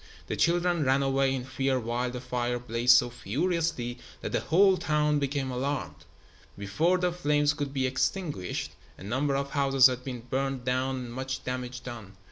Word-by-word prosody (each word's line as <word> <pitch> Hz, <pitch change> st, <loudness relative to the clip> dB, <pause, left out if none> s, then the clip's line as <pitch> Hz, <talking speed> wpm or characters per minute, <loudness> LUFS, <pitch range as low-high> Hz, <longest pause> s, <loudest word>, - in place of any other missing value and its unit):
The -, -, -3 dB
children 175 Hz, -1 st, +2 dB
ran 135 Hz, +1 st, +3 dB
away 135 Hz, 0 st, +2 dB
in 125 Hz, -1 st, -4 dB
fear 130 Hz, 0 st, 0 dB
while 120 Hz, +2 st, -2 dB
the 125 Hz, 0 st, -5 dB
fire 125 Hz, -1 st, -2 dB
blazed 120 Hz, +1 st, +4 dB
so 120 Hz, -1 st, +1 dB
furiously 140 Hz, -, -2 dB, 0.2 s
that -, -, -4 dB
the -, -, +1 dB
whole 190 Hz, +3 st, +4 dB
town 150 Hz, -2 st, +1 dB
became 140 Hz, -1 st, -2 dB
alarmed. 135 Hz, +3 st, -3 dB, 0.5 s
Before 155 Hz, -, +1 dB
the 180 Hz, 0 st, 0 dB
flames 150 Hz, -4 st, +2 dB
could 145 Hz, -2 st, -4 dB
be 135 Hz, -2 st, 0 dB
extinguished, 130 Hz, -, -2 dB, 0.3 s
a -, -, -11 dB
number 135 Hz, +7 st, 0 dB
of 140 Hz, 0 st, -2 dB
houses 135 Hz, -2 st, +4 dB
had 125 Hz, -1 st, +4 dB
been 125 Hz, -3 st, -5 dB
burned 130 Hz, +1 st, -2 dB
down 130 Hz, +1 st, 0 dB
and 125 Hz, -2 st, -6 dB
much 130 Hz, +1 st, -4 dB
damage 125 Hz, 0 st, -5 dB
done. 110 Hz, -6 st, -8 dB
130 Hz, 175 wpm, -28 LUFS, 125-145 Hz, 0.5 s, blazed